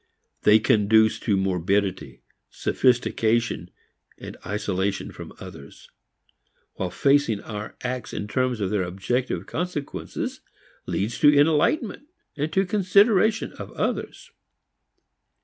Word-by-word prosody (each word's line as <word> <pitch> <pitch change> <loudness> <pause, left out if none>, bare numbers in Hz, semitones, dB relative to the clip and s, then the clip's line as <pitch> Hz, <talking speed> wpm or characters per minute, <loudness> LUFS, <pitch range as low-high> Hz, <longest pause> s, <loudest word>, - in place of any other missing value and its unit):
They 105 +1 +6
conduce 110 0 +3
to 105 -4 +1
morbidity, 95 -5 -1 0.3
sophistication, 120 -5 +1 0.7
isolation 100 -1 -2
from - - -10
others; 70 - -12 0.8
while 95 - -3
facing 135 +1 +2
our 105 -1 -7
acts 125 -2 -4
in 105 - -4
terms 125 0 -1
of 95 - -1
their 105 -2 +1
objective 95 +2 -2
consequences 160 -1 -4 0.5
leads 110 +4 -2
to 145 - +7
enlightenment 170 - +2 0.3
and 150 +2 -2
to 195 +1 +2
consideration 205 +2 +3
of - - -7
others. - - -3
110 Hz, 100 wpm, -24 LUFS, 100-145 Hz, 0.8 s, to